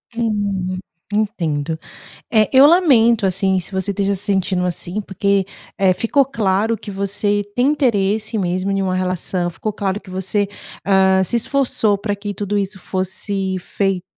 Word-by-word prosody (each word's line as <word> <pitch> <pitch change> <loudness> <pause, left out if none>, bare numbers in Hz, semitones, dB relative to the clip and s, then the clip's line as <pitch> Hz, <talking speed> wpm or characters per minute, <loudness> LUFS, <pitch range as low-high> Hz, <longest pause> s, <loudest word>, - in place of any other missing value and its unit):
Hum, 200 -5 -1 0.3
entendo, 165 -8 -1 0.5
eh, 215 -1 +4
eu 265 +1 +8
lamento, 250 - +5
assim, 190 0 +1
se 185 +2 -6
você 190 +1 -1
esteja 200 0 0
se 195 - -5
sentindo 190 -3 0
assim, 180 +3 -3
porque, 200 -1 0 0.3
eh, 190 -2 +4
ficou 265 +7 +2
claro 220 -2 0
que 210 -1 -9
você 205 +1 -1
tem 250 +2 +3
interesse 220 -6 +1
mesmo 185 0 -1
em 195 0 0
uma 185 -1 0
relação, 185 -1 -1
ficou 210 +6 -4
claro 195 -1 -2
que 190 - -14
você, 190 +2 -1 0.4
ah, 190 -1 +4
se 240 - +1
esforçou 235 -4 +1
pra 205 +1 -2
que 205 0 -5
tudo 205 +1 -2
isso 195 0 -3
fosse 190 +1 -2
fei 195 0 -1
200 Hz, 155 wpm, -19 LUFS, 190-215 Hz, 0.5 s, eu